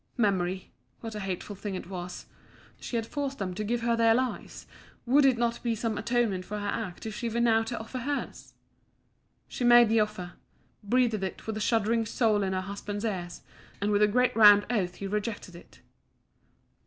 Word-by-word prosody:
Memory 190 -4 0 0.3
what 225 -1 -6
a 210 - -5
hateful 195 +1 -5
thing 200 0 -5
it - - -6
was! 180 -1 -7 0.5
She - - -6
had 225 -1 0
forced 275 +2 -4
them 185 -2 -3
to 215 - -4
give 235 +3 -1
her 235 0 +1
their 230 -1 +4
lives; 255 0 -3 0.4
would 275 +4 +4
it 260 -3 +4
not 235 0 -1
be 235 -2 -1
some 220 0 -2
atonement 220 -4 0
for 210 +3 -6
her 205 0 -4
act 205 -4 -4
if 220 - -4
she 235 +1 -3
were 230 +1 -2
now 225 -1 +4
to 225 +1 -4
offer 225 +3 -6
hers? 285 +4 -5 0.9
She - - -5
made 240 -1 +7
the 225 0 +3
offer 210 -5 -2 0.5
breathed 225 -1 +1
it 190 - -5
with 220 - -3
a - - -3
shuddering 225 +1 +1
soul 215 -2 +2
into 190 -1 -1
her - - -3
husband's 200 +2 -5
ears 180 -5 -4 0.4
and 205 +1 0
with 205 0 +2
a 210 - +6
great 250 +4 +2
round 205 -2 +8
oath 185 -6 -1
he 200 - -7
rejected 205 -2 -4
it. 170 - -16
215 Hz, 195 wpm, -28 LUFS, 200-235 Hz, 0.9 s, round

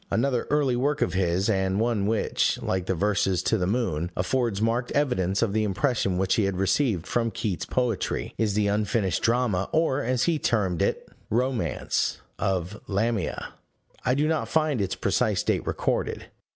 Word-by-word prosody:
Another 125 0 0
early 145 -4 +2
work 145 +4 +1
of - - -2
his, 95 0 +1
and 95 -2 +1
one 110 -3 +1
which, 110 0 +1
like 95 -1 -1
the 95 - +1
verses 100 0 +1
To - - +2
the 90 -4 0
Moon, 90 -7 -1
affords 115 +2 0
marked 115 +3 0
evidence 100 -9 +1
of 105 -4 0
the 110 0 +2
impression 105 -2 0
which 95 0 +1
he 110 - +2
had 95 -2 -1
received 95 - +1
from 115 +2 0
Keats's 100 -3 -3
poetry, 125 -6 -1
is 105 -3 0
the 105 -1 +2
unfinished 105 -2 0
drama 115 -5 +1
(or, 155 -4 +2
as 125 -1 0
he 165 -3 +1
termed 95 - 0
it, - - 0 0.2
"romance") 125 +1 0 0.2
of 95 +1 -2
Lamia: 105 -1 -1 0.5
I 125 - +2
do 150 +2 +2
not 160 -1 0
find 155 -7 +1
its 95 -1 -1
precise - - +1
date - - 0
recorded. - - -1
110 Hz, 170 wpm, -26 LUFS, 95-125 Hz, 0.5 s, early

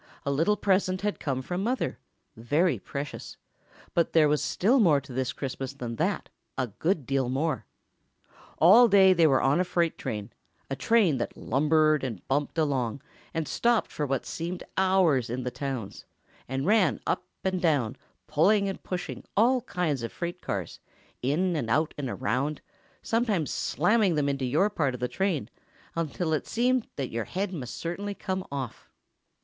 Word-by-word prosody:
A 140 - 0
little 165 +9 +2
present 185 -2 +1
had 205 0 -1
come 130 -3 -2
from 180 +6 -3
Mother—very 175 - -1
precious—but 145 +3 -5
there 155 -2 +6
was 150 0 +2
still 240 +9 +2
more 165 -10 +5
to 135 -2 -11
this 130 0 -1
Christmas 135 0 -5
than 120 -4 -6
that—a 130 - -3
good 165 -5 +1
deal 135 -2 0
more. 140 +2 -1 0.9
All 215 +9 +8
day 195 -3 +6
they 165 -3 +5
were 135 -3 +3
on 140 +5 +3
a - - +4
freight 170 -2 0
train, 105 -2 -5 0.4
a - - 0
train 170 - +3
that - - -4
lumbered 155 +1 +2
and 115 -8 -5
bumped 145 +4 -1
along, 135 -5 0 0.3
and 160 -3 -2
stopped 235 -1 +1
for 150 - -2
what 135 -2 -1
seemed 175 +2 -4
hours 185 -10 +3
in 125 +2 -3
the 125 - -3
towns, 125 -5 -5 0.4
and 135 +2 -2
ran 210 -1 +3
up 180 - -1 0.2
and 185 -1 0
down, 145 -10 +1 0.3
pulling 200 +6 +3
and 195 - -4
pushing 180 -1 -5
all 245 +4 +4
kinds 175 - -1
of 115 - -4
freight 175 +1 -5
cars, 95 -5 -4 0.4
in 165 +8 +1
and 120 -8 -2
out 155 +7 +1
and 140 -3 -4
around, 135 +4 -1 0.4
sometimes 220 - 0
slamming 195 +2 +2
them 145 -2 +1
into 140 -2 -1
your 160 +12 +2
part 140 -9 0
of - - -8
the 125 - 0
train, 175 - -1 0.5
until 165 0 -1
it 155 - -1
seemed 250 +1 +1
your 115 -5 -3
head 195 +1 -3
must 130 -8 -5
certainly 200 +4 -4
come 190 -1 -3
off. 135 -4 -5
155 Hz, 165 wpm, -27 LUFS, 135-185 Hz, 0.9 s, All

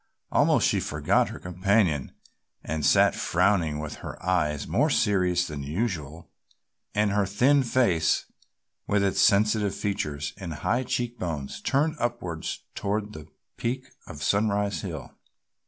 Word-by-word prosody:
Almost - - +4
she - - +2
forgot - - +1
her - - -7
companion 90 - +1 0.5
and 80 -1 -3
sat - - +5
frowning 90 -4 +1
with 75 0 -5
her - - -8
eyes 75 -6 0
more 150 - +2
serious 90 -8 +2
than 75 -4 -6
usual 80 - -4 0.6
and 105 0 +2
her 100 -1 +1
thin 130 +9 +4
face 115 -10 +2 0.6
with 100 -1 +2
its 100 - +2
sensitive 105 0 +3
features 75 -8 -3
and 90 -6 -6
high 120 +10 0
cheek 120 0 -2
bones 75 -6 -4
turned 155 +4 +1
upward 90 -10 -3 0.3
toward 105 +1 -2
the 80 -1 -10 0.3
peak 130 +2 -3 0.2
of 75 0 -8
Sunrise 100 +3 +1
Hill. 80 -9 -7
100 Hz, 135 wpm, -26 LUFS, 80-110 Hz, 0.6 s, sat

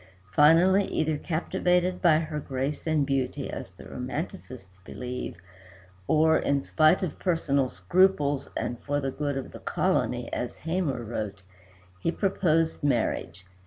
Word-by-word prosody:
Finally, 175 - +5
either 155 -4 0
captivated 180 +3 0
by 165 -4 +5
her 155 -1 -3
grace 135 +3 -3
and 155 -3 +2
beauty 135 -2 -2
as - - -6
the - - -15
romancists 95 0 -6
believe, 125 -1 -6 0.7
or 160 +1 +4
in 140 0 +1
spite 155 +4 +3
of 180 - -4
personal 140 -7 +1
scruples 145 - +2
and 120 - -3
"for 145 0 -1
the 135 -1 -2
good 145 0 -2
of 135 - -5
the - - -10
colony," - - 0
as - - -3
Hamor 160 -7 -2
wrote, 105 -4 -5 0.6
he 165 - 0
proposed 165 -6 +1
marriage. 110 - -1
150 Hz, 135 wpm, -27 LUFS, 130-165 Hz, 0.7 s, Finally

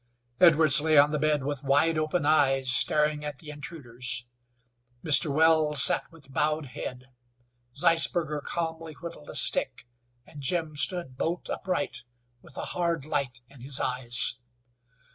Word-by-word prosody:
Edwards 155 -4 +6
lay 155 0 +2
on 145 +1 +5
the 150 - -2
bed 150 -2 0
with 145 0 -4
wide 145 +4 +2
open 155 +1 -1
eyes 135 -4 +2
staring 150 +3 +2
at 150 -2 -6
the 150 0 -10
intruders. 125 -4 -3 0.8
Mr. 150 0 +5
Wells 155 -1 +3
sat - - +1
with 150 -5 -15
bowed 150 +1 0
head. 125 0 -7 0.7
Zeisberger 165 -2 +2
calmly 165 0 -5
whittled 160 - -11
a - - -9
stick, - - 0 0.4
and 150 - -12
Jim 160 +2 -2
stood 150 -4 -1
bolt 170 +5 -3
upright, 185 -9 -3 0.4
with 135 - -11
a - - -4
hard 170 -4 -2
light 135 -6 -3
in 135 -2 -17
his 135 +1 0
eyes. 125 -1 -1
150 Hz, 145 wpm, -27 LUFS, 135-160 Hz, 0.8 s, Edwards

